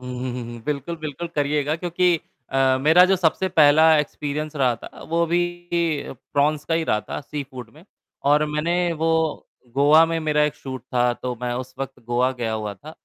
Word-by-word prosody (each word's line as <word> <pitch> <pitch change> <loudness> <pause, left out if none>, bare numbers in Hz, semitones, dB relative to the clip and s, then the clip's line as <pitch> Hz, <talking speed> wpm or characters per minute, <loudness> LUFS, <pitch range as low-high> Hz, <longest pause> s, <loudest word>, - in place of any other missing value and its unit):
हुँ, 125 0 -7
हुँ, 130 0 -3
हुँ, 125 0 -5
हुँ। 120 - -9
बिल्कुल, 150 +3 -3
बिल्कुल। 155 +1 -6
करिएगा 145 +1 0
क्योंकि 175 0 +1 0.3
अ, 135 -1 +3
मेरा 160 +6 +6
जो 190 +1 +3
सबसे 185 +1 +1
पहला 155 -2 +5
एक्सपीरियंस 150 +1 -3
रहा 130 -4 +2
था - - -12
वो 170 +1 +2
भी 170 +1 +1 0.9
प्रॉन्स 145 +1 +1
का 165 - 0
ही 165 - +1
रहा 105 - +1
था - - -6
सी 150 0 -5
फ़ूड 130 -4 -10
में 155 +3 -17 0.5
और 150 +1 +4
मैंने 170 +4 0
वो 165 0 -1 0.7
गोवा 145 +4 +6
में 165 0 -1
मेरा 150 -1 +1
एक 150 - -1
शूट 130 -2 -8
था, 125 -1 +1
तो 125 +1 -4
मैं 125 0 -1
उस 130 +1 -6
वक़्त 135 0 -6
गोवा 120 +2 +1
गया 120 -3 -3
हुआ 105 -2 -3
था, 145 +11 -12
150 Hz, 200 wpm, -23 LUFS, 130-160 Hz, 0.9 s, मेरा